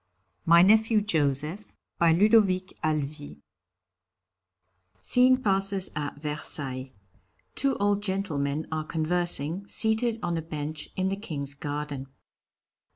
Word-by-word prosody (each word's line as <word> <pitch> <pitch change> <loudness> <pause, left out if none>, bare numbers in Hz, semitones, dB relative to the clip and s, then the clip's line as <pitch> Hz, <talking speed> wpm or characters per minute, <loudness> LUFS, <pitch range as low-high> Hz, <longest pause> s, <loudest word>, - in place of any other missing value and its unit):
MY 170 +1 +7
NEPHEW 220 +2 +4
JOSEPH 155 +1 -1 0.3
BY 170 -1 +5
LUDOVIC 195 -1 +3
HALEVY 150 - -3 1.6
(_Scene 255 +1 +4
passes 195 -1 0
at 145 -1 -4
Versailles; 140 -3 -4 0.6
two 275 0 0
old 205 0 +1
gentlemen 160 -7 -2
are 155 0 -2
conversing, 170 +2 -1
seated 220 +2 +1
on 170 -1 -1
a - - -2
bench 155 -1 -5
in 190 0 0
the 195 - -1
King's 145 -9 -5
garden. 145 -1 -5
170 Hz, 105 wpm, -27 LUFS, 150-200 Hz, 1.6 s, MY